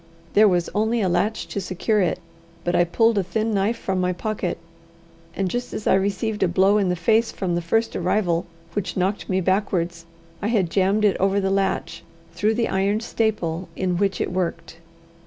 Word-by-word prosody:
There 215 Hz, +1 st, +6 dB
was 175 Hz, -3 st, +2 dB
only 220 Hz, +3 st, +1 dB
a 190 Hz, -, +2 dB
latch 185 Hz, +5 st, 0 dB
to 200 Hz, -, -3 dB
secure 195 Hz, +4 st, 0 dB
it, 175 Hz, -, +1 dB, 0.5 s
but 175 Hz, -, -1 dB
I 175 Hz, -, +4 dB
pulled 225 Hz, +5 st, +2 dB
a -, -, 0 dB
thin 215 Hz, +5 st, -1 dB
knife 205 Hz, +4 st, +1 dB
from 190 Hz, -4 st, -2 dB
my 180 Hz, 0 st, +1 dB
pocket, 200 Hz, 0 st, -3 dB, 0.8 s
and 195 Hz, -, 0 dB
just 245 Hz, +6 st, -3 dB
as 215 Hz, -, -5 dB
I -, -, +4 dB
received 205 Hz, +3 st, 0 dB
a 190 Hz, -, +4 dB
blow 190 Hz, +4 st, +3 dB
in 195 Hz, -3 st, +1 dB
the 180 Hz, -, +1 dB
face 220 Hz, +7 st, +2 dB
from 185 Hz, -2 st, -2 dB
the 175 Hz, -, 0 dB
first 225 Hz, +7 st, 0 dB
arrival 175 Hz, -2 st, 0 dB, 0.3 s
which 195 Hz, -3 st, -3 dB
knocked 190 Hz, +3 st, -1 dB
me 190 Hz, 0 st, +1 dB
backwards, 175 Hz, -3 st, -1 dB, 0.3 s
I 205 Hz, -, -1 dB
had 200 Hz, -7 st, +1 dB
jammed 200 Hz, +2 st, +2 dB
it 200 Hz, -, +3 dB
over 195 Hz, +1 st, +2 dB
the 195 Hz, -1 st, 0 dB
latch 195 Hz, -1 st, -1 dB, 0.3 s
through 215 Hz, +2 st, +1 dB
the 235 Hz, 0 st, +1 dB
iron 200 Hz, +2 st, +1 dB
staple 195 Hz, -7 st, -2 dB
in 180 Hz, -2 st, -1 dB
which 195 Hz, 0 st, 0 dB
it -, -, -1 dB
worked. 170 Hz, -2 st, -3 dB
195 Hz, 195 wpm, -23 LUFS, 180-215 Hz, 0.8 s, There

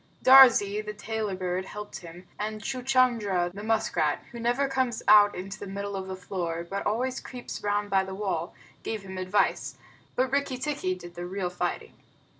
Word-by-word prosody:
Darzee, 240 Hz, -6 st, +7 dB
the 210 Hz, 0 st, -6 dB
Tailorbird, 190 Hz, -4 st, -3 dB
helped 210 Hz, +1 st, -7 dB
him, 175 Hz, +1 st, -12 dB
and 215 Hz, +1 st, -3 dB
Chuchundra, 240 Hz, -8 st, +1 dB
the 200 Hz, -, -7 dB
musk 220 Hz, 0 st, 0 dB
rat, -, -, +1 dB
who 240 Hz, -, -8 dB
never 245 Hz, +4 st, +1 dB
comes 260 Hz, -3 st, -1 dB
out 205 Hz, -1 st, +7 dB
into 190 Hz, +1 st, -6 dB
the 200 Hz, -, -7 dB
middle 200 Hz, +1 st, -4 dB
of 190 Hz, -1 st, -4 dB
the 190 Hz, -, -4 dB
floor, 175 Hz, -3 st, -4 dB
but 195 Hz, +2 st, -3 dB
always 255 Hz, +5 st, -1 dB
creeps 250 Hz, -2 st, -8 dB
round 205 Hz, 0 st, -1 dB
by 190 Hz, -1 st, +3 dB
the 190 Hz, 0 st, -6 dB
wall, 190 Hz, -4 st, -3 dB, 0.3 s
gave 220 Hz, -3 st, -4 dB
him 190 Hz, -1 st, -7 dB
advice, 190 Hz, +2 st, 0 dB, 0.4 s
but 255 Hz, 0 st, +1 dB
Rikki 280 Hz, -2 st, 0 dB
tikki 265 Hz, -9 st, -2 dB
did 175 Hz, -1 st, -11 dB
the 175 Hz, 0 st, -6 dB
real 185 Hz, -1 st, -3 dB
fighting. 180 Hz, -, -3 dB
205 Hz, 180 wpm, -27 LUFS, 185-235 Hz, 0.4 s, Darzee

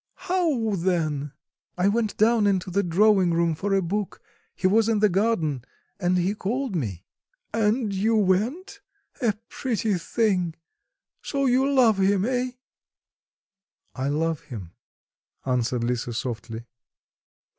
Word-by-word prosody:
"How 325 Hz, -, +1 dB
then?" 165 Hz, -6 st, -1 dB, 0.5 s
"I 180 Hz, +2 st, +2 dB
went 215 Hz, +1 st, 0 dB
down 220 Hz, -1 st, +4 dB
into 190 Hz, -2 st, 0 dB
the 200 Hz, +3 st, +2 dB
drawing 190 Hz, -1 st, +3 dB
room 170 Hz, -1 st, +2 dB
for 195 Hz, +5 st, -1 dB
a 195 Hz, -, +2 dB
book; 200 Hz, +3 st, -3 dB, 0.4 s
he -, -, -5 dB
was 220 Hz, +4 st, +4 dB
in 225 Hz, -, +2 dB
the 210 Hz, 0 st, +4 dB
garden 175 Hz, -, 0 dB, 0.4 s
and 180 Hz, -1 st, +1 dB
he 180 Hz, +3 st, +1 dB
called 230 Hz, +3 st, -2 dB
me." 100 Hz, -, -3 dB, 0.5 s
"And 220 Hz, 0 st, +1 dB
you 215 Hz, +4 st, +1 dB
went? 230 Hz, -, 0 dB, 0.4 s
A 230 Hz, -4 st, +2 dB
pretty 225 Hz, -4 st, -1 dB
thing! 180 Hz, -4 st, 0 dB, 0.7 s
So 275 Hz, -1 st, -1 dB
you 265 Hz, +2 st, +3 dB
love 235 Hz, -7 st, +4 dB
him, 195 Hz, 0 st, +2 dB
eh?" 250 Hz, 0 st, -1 dB, 1.4 s
"I 130 Hz, 0 st, -3 dB
love 160 Hz, +2 st, 0 dB
him," 105 Hz, -, -8 dB, 0.7 s
answered 125 Hz, -2 st, 0 dB
Lisa 120 Hz, 0 st, -2 dB
softly. 115 Hz, -1 st, -5 dB
195 Hz, 130 wpm, -25 LUFS, 165-225 Hz, 1.4 s, down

